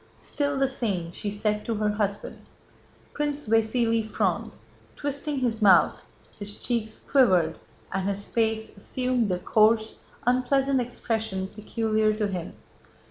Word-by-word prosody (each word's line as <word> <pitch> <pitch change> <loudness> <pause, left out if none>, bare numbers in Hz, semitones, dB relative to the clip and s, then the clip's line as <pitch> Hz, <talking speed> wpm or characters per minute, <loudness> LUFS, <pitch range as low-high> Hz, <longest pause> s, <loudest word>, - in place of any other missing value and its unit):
"Still 285 -1 -2
the 270 0 +3
same," 200 -10 -2
she 205 - -4
said 210 +1 -1
to 230 - -1
her 210 0 +1
husband. 205 -1 -3 0.7
Prince 295 -2 -2
Vasíli 225 0 +2
frowned, - - -1 0.4
twisting 285 +1 -3
his 230 -3 0
mouth, 185 -6 +5 0.4
his 205 0 -3
cheeks 225 -3 -2
quivered 185 - +3 0.3
and 190 +1 0
his 200 0 -3
face 220 -1 -1
assumed 250 +2 -1
the 180 - +1
coarse, 220 +4 +2 0.3
unpleasant 260 +2 +2
expression 220 -5 -2
peculiar 215 0 0
to 215 0 0
him. 180 -4 -5
220 Hz, 130 wpm, -26 LUFS, 205-250 Hz, 0.7 s, mouth